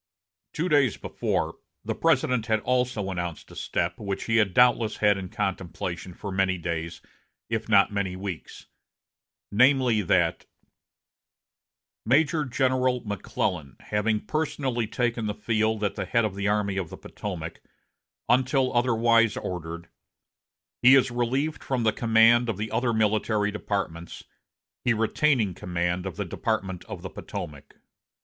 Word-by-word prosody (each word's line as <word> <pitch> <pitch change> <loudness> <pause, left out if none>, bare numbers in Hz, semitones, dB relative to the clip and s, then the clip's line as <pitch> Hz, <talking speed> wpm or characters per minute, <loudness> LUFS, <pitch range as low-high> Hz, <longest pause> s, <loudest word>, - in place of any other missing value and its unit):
Two 165 +3 -1
days 145 - +3
before, - - -2 0.3
the - - -1
President 125 -3 +1
had 110 -1 +2
also 125 -6 0
announced 85 -3 -5
a - - -12
step 85 +1 -2
which 100 -2 -3
he 115 -1 +1
had 105 -4 +3
doubtless 120 0 +3
had 105 -1 +4
in 95 -2 -6
contemplation 95 -4 -4
for 100 - -6
many 95 -1 +1
days, 85 -1 -4 0.5
if 110 -1 -2
not 100 -2 +5
many 100 -2 -1
weeks, 95 -3 -7 0.9
namely, 125 0 +4
that 90 - +1 1.6
"Major 150 +5 +2
General 130 0 +1
McClellan 90 - -3
having 105 +1 -1
personally 135 -7 -1
taken 120 -1 -1
the 105 - -2
field 110 0 0
at 105 - 0
the - - -4
head 115 -1 +2
of 105 - -2
the 100 +1 -2
Army 100 -2 0
of 90 -4 -2
the - - -9
Potomac, 85 -5 -7 0.7
until 130 +1 +2
otherwise 115 -2 +3
ordered, 85 -1 -5 0.9
he 130 +2 +8
is 130 -2 +4
relieved 130 +6 -1
from 130 -3 -1
the 110 -1 +3
command 115 +1 +4
of 110 - -2
the 105 +2 -4
other 120 +1 +1
military 110 -1 +1
departments, 95 -5 -4 0.6
he 120 - +2
retaining 115 -1 +2
command 90 +1 -2
of 95 - -6
the 105 +1 -3
Department 95 -2 -2
of - - -8
the - - -5
Potomac." 75 -2 -8
110 Hz, 140 wpm, -26 LUFS, 95-120 Hz, 1.6 s, he